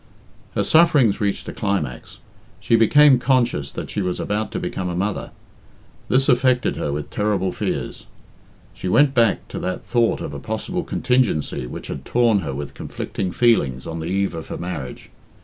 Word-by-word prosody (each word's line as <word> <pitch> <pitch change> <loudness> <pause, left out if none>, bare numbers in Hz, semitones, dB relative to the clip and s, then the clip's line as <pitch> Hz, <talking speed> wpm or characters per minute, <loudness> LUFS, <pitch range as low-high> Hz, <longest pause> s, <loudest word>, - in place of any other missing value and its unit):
Her - - +2
sufferings 150 -11 +4
reached 100 -1 -1
a - - -5
climax 95 - -3 0.4
she 115 - +2
became 130 +4 +6
conscious 120 - +1
that - - -6
she 105 - -2
was 90 -1 -2
about 105 +1 -2
to - - -3
become 90 -1 -3
a 90 - -3
mother. 100 +3 -2 0.8
This 135 +1 +3
affected 125 0 +3
her 75 - -2
with 75 +1 -4
terrible 100 -3 0
fears. - - -4 0.7
She - - -6
went 140 +9 +4
back 115 -5 +2
to - - -5
that 90 0 -3
thought 120 -2 +1
of 70 - -6
a 70 - -5
possible 170 - -3
contingency 125 - 0
which - - -7
had 65 - -6
torn 115 - +2
her 75 -7 -4
with 70 +1 -6
conflicting 95 -2 -4
feelings 70 - +2
on 80 0 -5
the 80 - -4
eve 95 +1 0
of 80 -1 -7
her - - -5
marriage. 85 -8 -6
100 Hz, 175 wpm, -21 LUFS, 85-120 Hz, 0.8 s, became